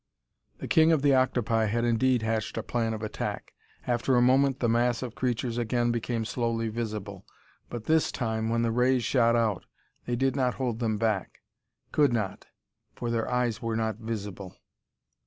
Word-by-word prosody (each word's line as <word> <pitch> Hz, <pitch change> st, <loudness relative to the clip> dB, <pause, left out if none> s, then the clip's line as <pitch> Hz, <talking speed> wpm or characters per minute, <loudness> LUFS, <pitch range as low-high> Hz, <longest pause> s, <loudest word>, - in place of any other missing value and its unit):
The -, -, -6 dB
king 160 Hz, 0 st, +5 dB
of 155 Hz, -4 st, +2 dB
the 140 Hz, -1 st, +5 dB
octopi 120 Hz, -4 st, +2 dB
had 115 Hz, +3 st, 0 dB
indeed 120 Hz, 0 st, +2 dB
hatched 110 Hz, -1 st, -2 dB
a -, -, -2 dB
plan 115 Hz, -2 st, -1 dB
of 110 Hz, -, -7 dB
attack. 105 Hz, -1 st, -4 dB, 0.3 s
After 125 Hz, +1 st, +1 dB
a 120 Hz, -, +4 dB
moment 135 Hz, +1 st, +3 dB
the 120 Hz, -, +1 dB
mass 120 Hz, +1 st, +1 dB
of 120 Hz, -3 st, -5 dB
creatures 120 Hz, -1 st, -2 dB
again 120 Hz, +1 st, +1 dB
became 115 Hz, -1 st, -2 dB
slowly 115 Hz, -1 st, -1 dB
visible, 105 Hz, -4 st, -5 dB, 0.5 s
but 120 Hz, -2 st, -6 dB
this 160 Hz, +5 st, +2 dB
time 110 Hz, -2 st, -2 dB
when 115 Hz, 0 st, +1 dB
the 115 Hz, -, +1 dB
rays 125 Hz, +1 st, +2 dB
shot 115 Hz, 0 st, +3 dB
out 110 Hz, -5 st, 0 dB, 0.4 s
they 120 Hz, -, 0 dB
did 135 Hz, +2 st, +1 dB
not 130 Hz, -3 st, +1 dB
hold 125 Hz, -4 st, -2 dB
them 110 Hz, -3 st, 0 dB
back. 105 Hz, -3 st, -1 dB, 0.5 s
Could 145 Hz, -4 st, +3 dB
not 105 Hz, -5 st, -3 dB, 0.5 s
for 120 Hz, -1 st, -3 dB
their 115 Hz, -1 st, -1 dB
eyes 125 Hz, -3 st, 0 dB
were 115 Hz, -1 st, -2 dB
not 110 Hz, -2 st, -1 dB
visible. 105 Hz, -4 st, -6 dB
115 Hz, 175 wpm, -28 LUFS, 110-125 Hz, 0.5 s, king